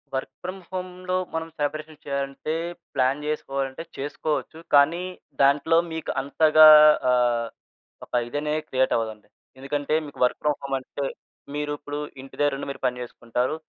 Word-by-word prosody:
Work 130 Hz, -, -3 dB
from 185 Hz, +2 st, -5 dB
హోమ్‌లో 185 Hz, 0 st, -4 dB, 0.2 s
మనం 160 Hz, 0 st, -2 dB
celebration 155 Hz, +1 st, -3 dB
చేయాలంటే, 140 Hz, +2 st, -3 dB, 0.4 s
ప్లాన్ 130 Hz, +3 st, +2 dB
చేసుకోవాలంటే 135 Hz, -1 st, -3 dB
చేసుకోవచ్చు. 150 Hz, +3 st, -3 dB, 0.2 s
కానీ 150 Hz, +5 st, +5 dB, 0.4 s
దాంట్లో 140 Hz, +4 st, +4 dB, 0.2 s
మీకు 160 Hz, -1 st, -3 dB
అంతగా 155 Hz, +2 st, +6 dB, 0.4 s
ఆహ్, 120 Hz, -2 st, +2 dB, 0.6 s
ఒక -, -, -41 dB
ఇదనేది 150 Hz, +3 st, -2 dB
క్రియేటవ్వదండి. 115 Hz, -4 st, 0 dB, 0.3 s
ఎందుకంటే, 145 Hz, +2 st, -2 dB
మీకు 145 Hz, -, -11 dB
వర్క్ 125 Hz, -, -1 dB
ఫ్రామ్ 150 Hz, -1 st, +1 dB
హోమ్ 135 Hz, -1 st, -1 dB
అంటే, 140 Hz, +2 st, -5 dB, 0.5 s
మీరిప్పుడు 145 Hz, 0 st, -3 dB, 0.2 s
ఇంటిదరుండి 140 Hz, +1 st, -1 dB
మీరు -, -, -10 dB
పని 125 Hz, 0 st, -3 dB
చేసుకుంటారు. 120 Hz, +3 st, -2 dB
145 Hz, 125 wpm, -25 LUFS, 135-155 Hz, 0.6 s, అంతగా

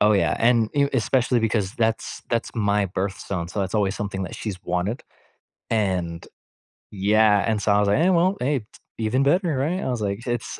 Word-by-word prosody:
Oh, 105 Hz, +1 st, +5 dB
yeah. 100 Hz, -, +2 dB
And 115 Hz, -1 st, +3 dB
y 140 Hz, -1 st, +3 dB
especially 125 Hz, 0 st, +1 dB
because 105 Hz, -3 st, 0 dB
that's 115 Hz, -2 st, -2 dB
that's 115 Hz, -1 st, -1 dB
my 105 Hz, -2 st, +1 dB
birthstone, 95 Hz, -1 st, -4 dB
so 100 Hz, -, -3 dB
that's 95 Hz, +1 st, -3 dB
always 100 Hz, -2 st, +1 dB
something 100 Hz, -2 st, -4 dB
that 90 Hz, -, -7 dB
she's 100 Hz, -4 st, -6 dB
wanted. 90 Hz, +6 st, -2 dB, 0.7 s
And 90 Hz, -6 st, -1 dB, 0.7 s
yeah. 105 Hz, +1 st, +3 dB
And 110 Hz, -2 st, 0 dB
so 105 Hz, -, +1 dB
I 100 Hz, -, +4 dB
was 105 Hz, -, +2 dB
like, 100 Hz, -, +3 dB
"Hey. 180 Hz, -, +4 dB
Well, 185 Hz, +2 st, +3 dB
hey. 140 Hz, +1 st, +1 dB
T 105 Hz, -, -15 dB, 0.3 s
even 115 Hz, +4 st, +1 dB
better, 165 Hz, +1 st, +2 dB
right?" 165 Hz, +8 st, -1 dB
I -, -, -2 dB
was 125 Hz, -2 st, -1 dB
like, 100 Hz, +2 st, -3 dB
it's 120 Hz, -2 st, -3 dB
110 Hz, 200 wpm, -23 LUFS, 100-125 Hz, 0.7 s, Oh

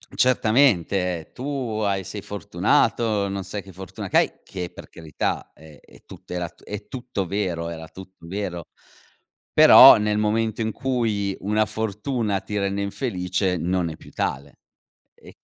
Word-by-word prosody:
Certamente. 100 Hz, -, +2 dB
"Tu 125 Hz, -5 st, -3 dB
hai 100 Hz, -2 st, -1 dB
sei 100 Hz, +2 st, -6 dB
fortunato, 105 Hz, +2 st, +1 dB
non 100 Hz, -1 st, -4 dB
sai 100 Hz, +2 st, -5 dB
che 95 Hz, -1 st, -14 dB
fortuna 95 Hz, +1 st, -8 dB
che -, -, +2 dB
hai." -, -, +3 dB
Che 90 Hz, -2 st, -6 dB
per -, -, -11 dB
carità, 80 Hz, -3 st, -4 dB
ehm, 80 Hz, -1 st, -16 dB
e -, -, -20 dB
tutto -, -, -13 dB
era 90 Hz, -1 st, -2 dB
t -, -, -21 dB
è 105 Hz, 0 st, -7 dB
tutto 120 Hz, -6 st, -4 dB
vero, 90 Hz, -3 st, -2 dB
era 80 Hz, -1 st, -7 dB
tutto 95 Hz, -2 st, -13 dB
vero. 90 Hz, -2 st, -5 dB, 0.9 s
Però, -, -, +10 dB
nel 105 Hz, 0 st, 0 dB
momento 110 Hz, +1 st, 0 dB
in 110 Hz, 0 st, -1 dB
cui 110 Hz, -7 st, -1 dB
una 105 Hz, +2 st, +1 dB
fortuna 110 Hz, 0 st, -2 dB
ti 105 Hz, -, -5 dB
rende 100 Hz, 0 st, -1 dB
infelice, 95 Hz, -4 st, -1 dB
non 90 Hz, +1 st, -1 dB
è 80 Hz, -, -8 dB
più -, -, -15 dB
tale, 70 Hz, +2 st, -4 dB, 0.6 s
e -, -, -16 dB
100 Hz, 155 wpm, -23 LUFS, 90-110 Hz, 0.9 s, Però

